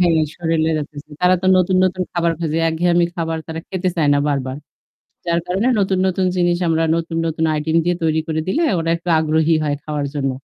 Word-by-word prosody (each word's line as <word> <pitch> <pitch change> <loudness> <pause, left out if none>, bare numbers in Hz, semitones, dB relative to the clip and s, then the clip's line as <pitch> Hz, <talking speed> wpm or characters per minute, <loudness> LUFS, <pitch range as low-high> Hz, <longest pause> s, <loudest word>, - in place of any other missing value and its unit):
হ্যাঁ। 170 -3 +3 0.2
শরীরে 160 -1 0
যাচ্ছে। 145 0 -8
তারা 180 +1 +4
তো - - 0
নতুন, 185 0 +2
নতুন 185 0 0
খাবার 170 -1 +1
খোঁজে। 160 -1 -1
একঘেয়েমি 170 +1 +2
খাবার 165 -1 -2
তারা 160 0 -5
খেতে 185 -1 -2
চায় 155 -3 +2
না - - +2
বারবার। 135 -2 -2 0.7
যার 170 0 +1
কারণে 195 +7 0
নতুন, 190 -1 +1
নতুন 185 0 0
জিনিস 175 -1 +2
আমরা 165 0 +2
নতুন, 165 0 -3
নতুন 160 0 -1
item 160 +2 -1
দিয়ে 175 0 +1
তৈরি 160 -1 +1
করে 160 0 -1
দিলে 320 - +1 0.2
ওরা 165 0 -1
একটু 170 +1 -9
আগ্রহী 160 +1 +2
হয় 145 -1 0
খাওয়ার 150 -2 -2
জন্য। 135 -2 -1
165 Hz, 200 wpm, -19 LUFS, 155-175 Hz, 0.7 s, তারা